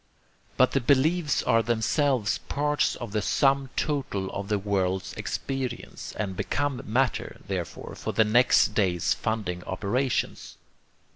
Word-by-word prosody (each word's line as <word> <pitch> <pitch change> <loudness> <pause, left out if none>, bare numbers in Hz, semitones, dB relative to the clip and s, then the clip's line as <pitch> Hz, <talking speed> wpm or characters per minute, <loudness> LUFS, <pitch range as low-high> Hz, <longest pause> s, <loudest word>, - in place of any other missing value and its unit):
But 130 - +5
the 135 - +1
beliefs 145 +4 +2
are 115 - +3
themselves 120 +1 +1
parts 145 +1 +1
of 120 -4 -7
the 105 0 0
sum 135 +4 +2
total 135 -11 -1
of 100 0 -5
the 105 0 +1
world's 95 -2 -1
experience, 130 -3 -4
and 95 -3 -2
become 145 +6 -1
matter, 125 +4 0
therefore, - - -5
for - - -4
the 110 - +4
next 120 +4 +4
day's 90 -5 +2
funding 100 -6 -3
operations. 115 +7 -2
120 Hz, 130 wpm, -27 LUFS, 100-135 Hz, -, But